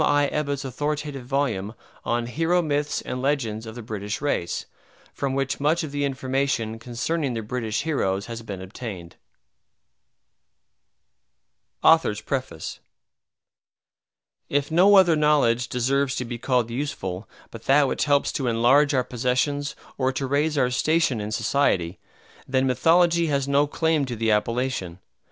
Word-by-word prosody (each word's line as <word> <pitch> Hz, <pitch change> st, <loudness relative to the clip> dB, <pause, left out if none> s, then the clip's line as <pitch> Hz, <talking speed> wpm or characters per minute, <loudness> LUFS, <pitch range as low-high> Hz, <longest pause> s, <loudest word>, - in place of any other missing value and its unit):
I. 145 Hz, -1 st, +3 dB
Ebbutt's 140 Hz, -2 st, -2 dB
authoritative 145 Hz, 0 st, -3 dB
volume 120 Hz, -7 st, -1 dB, 0.3 s
on 120 Hz, 0 st, -1 dB
"Hero 165 Hz, +8 st, +1 dB
Myths 145 Hz, -1 st, -1 dB
and 125 Hz, -, -4 dB
Legends 115 Hz, -6 st, -1 dB
of 110 Hz, -, -8 dB
the 120 Hz, -, -7 dB
British 105 Hz, -1 st, -4 dB
Race," 140 Hz, -12 st, -2 dB, 0.5 s
from 135 Hz, -1 st, -2 dB
which 135 Hz, -1 st, -1 dB
much 155 Hz, +4 st, +1 dB
of 155 Hz, -, -5 dB
the 145 Hz, 0 st, -1 dB
information 130 Hz, -4 st, -1 dB
concerning 125 Hz, +4 st, -2 dB
the 115 Hz, -, -3 dB
British 110 Hz, -1 st, -2 dB
heroes 100 Hz, -11 st, -1 dB
has 115 Hz, +1 st, -6 dB
been 100 Hz, -4 st, -7 dB
obtained 95 Hz, -3 st, -8 dB, 2.7 s
AUTHOR'S 160 Hz, -10 st, +4 dB
PREFACE 130 Hz, -, -4 dB, 1.7 s
If 145 Hz, +1 st, 0 dB
no 190 Hz, +5 st, +6 dB
other 180 Hz, -4 st, +6 dB
knowledge 145 Hz, -6 st, +2 dB
deserves 135 Hz, +2 st, 0 dB
to 125 Hz, -, -3 dB
be 120 Hz, 0 st, -6 dB
called 125 Hz, -2 st, 0 dB
useful 115 Hz, -8 st, -4 dB, 0.2 s
but 115 Hz, -1 st, -11 dB
that 140 Hz, +1 st, +5 dB
which -, -, -1 dB
helps 145 Hz, -1 st, +2 dB
to 135 Hz, -, -2 dB
enlarge 130 Hz, +6 st, +4 dB
our 130 Hz, -, +2 dB
possessions 130 Hz, +4 st, -1 dB, 0.2 s
or 130 Hz, 0 st, +2 dB
to 135 Hz, -, -2 dB
raise 145 Hz, +3 st, 0 dB
our 125 Hz, -2 st, +2 dB
station 155 Hz, -3 st, +1 dB
in 105 Hz, +1 st, -5 dB
society, 95 Hz, -8 st, 0 dB, 0.5 s
then 130 Hz, 0 st, +1 dB
Mythology 165 Hz, +6 st, +3 dB
has 140 Hz, -2 st, 0 dB
no 140 Hz, +1 st, +3 dB
claim 160 Hz, -1 st, +1 dB
to 125 Hz, -2 st, -5 dB
the 110 Hz, 0 st, +1 dB
appellation. 105 Hz, -4 st, -1 dB
130 Hz, 140 wpm, -24 LUFS, 115-145 Hz, 2.7 s, no